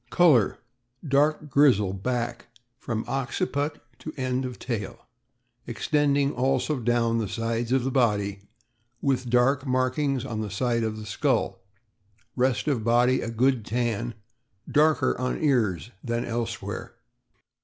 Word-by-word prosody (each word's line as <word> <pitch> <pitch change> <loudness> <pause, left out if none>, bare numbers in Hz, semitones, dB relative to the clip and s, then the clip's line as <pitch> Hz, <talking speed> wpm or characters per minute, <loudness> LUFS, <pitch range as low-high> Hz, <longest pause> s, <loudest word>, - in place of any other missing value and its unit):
Color. 140 - +4 0.2
— 120 +5 -16
Dark 150 +2 +2
grizzle 115 -10 +4
back, 120 +6 -3 0.3
from 115 -3 -3
occiput 140 +3 -2 0.2
to 155 - -6
end 130 0 -1
of 125 -1 -6
tail, 115 -1 -5 0.6
extending 140 +3 +1
also 135 +3 0
down 115 -1 +1
the 110 - -1
sides 115 +2 -2
of 130 -1 +2
the 135 - -1
body, 105 -6 +1 0.6
with 130 -3 0
dark 125 +3 +3
mark 130 0 0
ings 135 -4 0
on 110 -4 -3
the 105 - -4
side 115 +4 0
of 110 -1 -2
the 110 - -7
skull; 105 - 0 0.8
rest 130 +2 +1
of 130 -7 0
body 120 +3 +3
a 115 - -3
good 120 +1 +1
tan, 115 0 -2 0.5
darker 150 -3 +3
on 125 - -1
ears 115 - +1
than 120 0 -2
elsewhere. 115 -1 -4
125 Hz, 135 wpm, -26 LUFS, 115-135 Hz, 0.8 s, Color